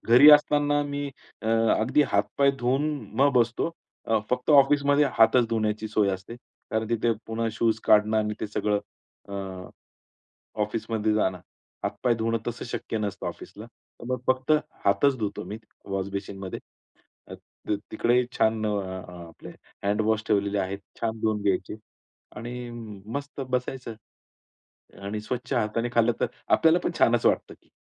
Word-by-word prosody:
घरी 125 +6 +9
असताना 145 0 +4
मी 145 0 -3 0.4
अगदी 115 +5 +3
हात-पाय 105 +7 +3
धुवून 130 +4 +1 0.4
मग 140 +1 +5
बसतो. 120 +6 +2 0.4
अ, 110 -1 +3
फक्त 125 +4 0
ऑफिसमध्ये 145 0 +5
हातच 115 +2 +5
धुण्याची 110 -1 -1
सोय 105 -1 +2
असते. 95 +5 -6 0.3
कारण 110 0 -1
तिथे 115 0 +2
पुन्हा 115 0 -1
शूज 110 0 +1
काढणं 105 +1 +4
आणि 105 0 -1
ते - - -2
सगळं 105 0 0 0.5
अ, 100 - -7 1.3
ऑफिसमध्ये 110 0 -1
जाणं. 95 -4 +1 0.4
हातपाय 125 - 0
धुणं 115 0 0
तसं 120 -1 -4
शक्य 115 -2 -4
नसतं 105 -2 -3
ऑफिसला. 105 +2 -8
तर 120 0 -17
मग 125 - -2
फक्त 130 +2 +1 0.3
हातच 115 +8 +3
धुतो 105 -3 -3
मी 105 +4 -6 0.4
वॉश 95 0 -2
बेसीनमध्ये. 95 -1 -5 0.7
अ, - - -9 0.4
त 105 - +3 0.2
तिकडेही 120 +3 +2
छान 110 0 +2
अ, - - 0 0.6
आपले 80 - -12 0.3
हँडवॉश 110 +2 +1
ठेवलेले 100 -1 +1
आहेत. 95 +1 -3 0.2
छान 115 -1 -2
धुवून 110 -1 0
घ्यायचे 95 0 0 0.6
आणि 120 +2 -6 0.5
मस्त 140 0 -5
बसायचं. 125 -1 -3 1.1
आणि 105 +2 -3
स्वच्छ 125 +4 -4
हाताने 115 0 0
खाल्लं 115 0 +4
तर - - +4 0.3
आपल्याला 165 +2 +5
पण - - 0
छानच 115 0 +3
वाटतं - - +2
की. - - -31
115 Hz, 140 wpm, -26 LUFS, 105-125 Hz, 1.3 s, घरी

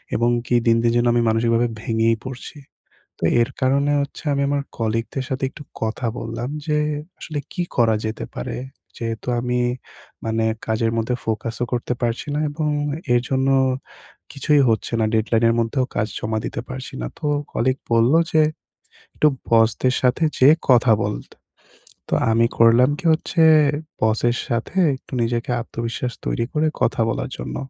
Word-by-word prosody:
এবং 120 +1 +2 0.2
কি 120 - +1
দিন, 115 - +5
দিন 120 - +3
যে - - +4
আমি 120 - +3
মানসিকভাবে 115 +1 +2
ভেঙেই 115 0 +1
পড়ছি। 130 +3 -8 0.6
তো - - -4 0.2
এর 115 - +1
কারণে 140 +3 +2
হচ্ছে 140 - -7
আমি 140 - 0
আমার 140 0 0 0.2
কলিগদের 115 +3 -2
সাথে 135 0 -2
একটু 150 - -11 0.2
কথা 115 +2 -2
বললাম 115 +2 -4 0.2
যে 150 -1 +1 0.4
আসলে 155 -3 -5
কি 180 - -2
করা 115 -3 +4
যেতে 110 +1 -3
পারে। - - -4 0.4
যেহেতু 115 +1 -5
আমি 125 0 -1 0.6
মানে 110 0 0 0.2
কাজের 115 0 +1
মধ্যে 115 +2 0
ফোকাসও 115 +1 -2
করতে 125 0 -1
পারছি 120 +4 -1
না - - 0
এবং 150 0 -1 0.4
এর 120 - +4
জন্য 135 0 +1 0.8
কিছুই 145 +1 +2
হচ্ছে 110 +1 0
না, - - +3
ডেডলাইনের 115 +1 +2
মধ্যেও 125 +3 0
কাজ 110 - +1
জমা 110 0 -2
দিতে - - -4
পারছি 130 0 -7
না। - - -2
তো - - -4 0.3
কলিগ 130 +3 +1 0.2
বললো 115 +7 +4
যে 155 - +5 0.7
একটু - - +3 0.2
বসদের 115 +2 +3
সাথে 130 +6 +2 0.2
যে 130 - +8 0.2
কথা 125 -2 +5
বলতে। 105 0 -5 0.7
তো - - +1 0.2
আমি 115 +1 +4
করলাম 115 +4 +6
কি, - - -10
হচ্ছে 165 +1 +1 0.6
বসের 115 +2 +2
সাথে 120 +8 -3 0.2
একটু 130 - -14
নিজেকে 115 +1 -1
আত্মবিশ্বাস 115 +1 -4
তৈরি 115 - 0
করে 155 +1 +1 0.2
কথা - - +1
বলার 130 +4 -2
জন্য। - - -5
120 Hz, 160 wpm, -21 LUFS, 115-130 Hz, 0.8 s, যে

